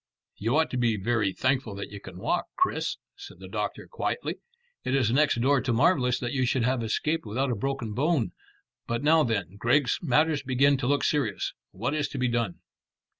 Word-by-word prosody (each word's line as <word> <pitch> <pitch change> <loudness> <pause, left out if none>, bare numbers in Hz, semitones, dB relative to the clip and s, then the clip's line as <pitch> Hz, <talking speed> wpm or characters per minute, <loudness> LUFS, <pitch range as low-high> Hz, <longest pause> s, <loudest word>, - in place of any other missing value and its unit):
"You 115 +8 +1
ought 160 - +2
to 125 - -2
be 115 -3 +2
very 105 0 +1
thankful 130 +1 0
that 100 0 -6
you 100 - -7
can 95 -2 -10
walk, 175 - -1
Chris," 370 0 0 0.2
said 400 0 -11
the - - -10
doctor - - -3
quietly. 475 0 -3 0.5
"It 130 - 0
is 125 -5 +2
next 145 -1 +3
door 135 +1 +3
to 125 - -1
marvellous 125 0 +3
that 120 -1 -2
you 130 -2 +1
should 125 -1 +1
have 125 0 +1
escaped 150 +9 -1
without 125 +5 -1
a - - 0
broken 125 -1 -3
bone. 145 0 +1 0.6
But 120 +2 -2
now 160 +2 +5
then, 100 - -2
Griggs, 125 +2 +2
matters 155 0 +2
begin 135 +2 +3
to 130 -2 -2
look 140 0 +2
serious. 135 -10 0 0.2
What 115 +9 -3
is 150 -2 0
to - - -7
be 125 -1 +1
done?" 115 -6 -1
125 Hz, 200 wpm, -27 LUFS, 115-145 Hz, 0.6 s, now